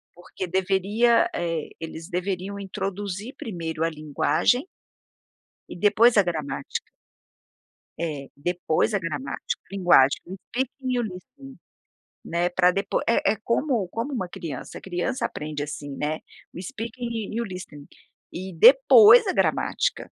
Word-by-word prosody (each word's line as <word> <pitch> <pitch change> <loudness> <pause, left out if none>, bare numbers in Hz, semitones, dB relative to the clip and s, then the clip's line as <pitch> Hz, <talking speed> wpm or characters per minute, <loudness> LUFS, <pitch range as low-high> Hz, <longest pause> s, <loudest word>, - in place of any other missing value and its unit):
Porque 180 +1 -7
deveria, 200 - +2
eh, 165 -2 -2
eles 165 +2 -7
deveriam 190 +2 -3
introduzir 200 +3 -5
primeiro 165 -6 -4
a 165 - +2
linguagem 155 - +1 1.1
e - - -10
depois 230 +3 +6
a 205 - +6
gramática. 155 -4 -4 1.1
Eh, 150 -5 -4
depois 175 +4 0
a 200 - +2
gramática, 145 -5 -4
linguagem, 175 -8 +4
o 190 - -6
speaking 255 +1 -2
e 245 - +1
o - - +2
listening, 235 +7 -9 0.7
né, 170 +1 0
para 180 0 +4
depois 195 +2 -1
é 230 - +3
é - - -5
como 235 -6 0
como 235 +8 -4
uma 185 -8 -3
criança, 150 -8 -7
a - - -10
criança 190 +8 -2
aprende 150 -1 -4
assim, 145 -1 -6
né, 155 +1 -2 0.3
o 175 - -7
speaking 230 +2 -5
e 235 - 0
o - - -1
listening 180 -7 -9 0.5
e 185 +1 -6
depois 465 - +8
a - - +1
gramática. - - +1
185 Hz, 135 wpm, -25 LUFS, 165-230 Hz, 1.1 s, depois